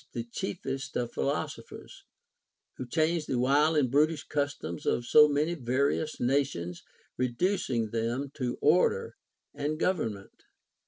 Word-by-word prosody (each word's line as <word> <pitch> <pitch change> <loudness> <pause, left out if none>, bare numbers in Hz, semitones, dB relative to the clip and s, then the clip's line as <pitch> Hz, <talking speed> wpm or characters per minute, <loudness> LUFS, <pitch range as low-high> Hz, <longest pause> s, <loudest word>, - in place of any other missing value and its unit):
481 120 - -3
the - - -30
chiefest 135 +6 -4
of 120 -1 -1
philosophers, - - -4 0.7
who 130 - -6
changed 160 +3 0
the 130 - -1
wild 145 +5 +3
and 130 -5 +2
brutish 150 +2 +2
customs 145 - -3
of 120 - +1
so 150 +4 +7
many 150 +4 +1
various 140 +2 -1
nations, 120 -10 -1 0.4
reducing 125 - 0
them 120 +5 -2
to 125 -4 -3
order 180 - +3 0.4
and 150 +2 -3
government. 110 - -2
140 Hz, 125 wpm, -29 LUFS, 120-155 Hz, 0.7 s, so